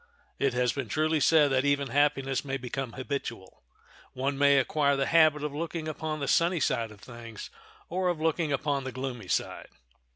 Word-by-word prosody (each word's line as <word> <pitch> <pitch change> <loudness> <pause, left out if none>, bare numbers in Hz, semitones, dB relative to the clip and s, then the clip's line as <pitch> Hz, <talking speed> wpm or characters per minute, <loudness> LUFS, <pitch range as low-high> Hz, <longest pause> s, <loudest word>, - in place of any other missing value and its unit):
It 135 -3 +1
has 125 -1 +1
been 135 -6 -4
truly 155 +3 +1
said 150 0 +4
that 130 0 +2
even 140 -1 +1
happiness 135 0 +1
may 135 -1 -3
become 125 -1 -5
habitual. 130 -7 -6 0.5
One 135 +2 -1
may 140 0 +4
acquire 140 +1 +2
the 135 0 0
habit 155 -2 +4
of 150 -1 -3
looking 160 +1 -4
upon 155 0 -4
the 140 - -3
sunny 170 +1 +2
side 120 -5 0
of 105 -1 -15
things, 115 -3 -10 0.4
or 180 +1 0
of 175 -3 -1
looking 160 -1 0
upon 140 0 -1
the 130 - -5
gloomy 125 -5 -5
side. - - -2
140 Hz, 185 wpm, -28 LUFS, 130-155 Hz, 0.5 s, said